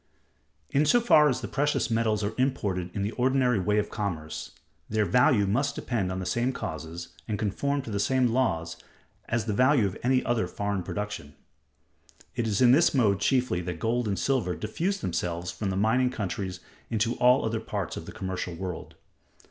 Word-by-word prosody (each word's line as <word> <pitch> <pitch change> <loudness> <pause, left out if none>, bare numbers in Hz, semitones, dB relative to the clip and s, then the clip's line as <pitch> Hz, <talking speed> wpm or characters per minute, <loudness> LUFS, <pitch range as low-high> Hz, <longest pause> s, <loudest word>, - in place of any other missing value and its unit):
In 140 - +3
so 240 - +5
far 155 -11 +5
as 130 - -1
the - - -4
precious 145 -3 0
metals 110 -2 +1
are 100 - -1
imported 100 -9 0
in 100 - -1
the 105 - -1
ordinary 125 -2 +2
way 105 +3 +1
of 105 - 0
commerce, 85 -8 -4 0.4
their 110 -1 +1
value 125 -2 +4
must 135 +9 0
depend 105 -7 -2
on 95 - -3
the 95 - -4
same 120 +8 0
causes, 80 -1 -6 0.2
and 105 -2 -1
conform 140 +8 -1
to 115 - -7
the 100 - -1
same 130 +4 +2
laws, 85 -10 0 0.5
as 115 -2 0
the 110 - -1
value 130 +1 +4
of 95 - -2
any 130 +1 +2
other 115 -6 +1
foreign 100 +1 -2
production. 105 -5 -5 1.0
It 115 - -1
is 105 0 0
in 125 -1 +7
this 150 +3 +4
mode 105 -7 +3
chiefly 125 -6 +1
that 90 -1 -4
gold 115 +6 0
and 100 -2 -1
silver 105 -3 0
diffuse 175 - -2
themselves 85 0 -2
from 100 - -3
the 95 - -2
mining 120 +5 +3
countries 95 -4 -4 0.3
into 115 +1 +1
all 125 +1 +4
other 115 0 -1
parts - - -4
of - - -7
the - - -6
commercial 95 -4 -4
world. 90 0 -6
110 Hz, 190 wpm, -27 LUFS, 95-125 Hz, 1.0 s, in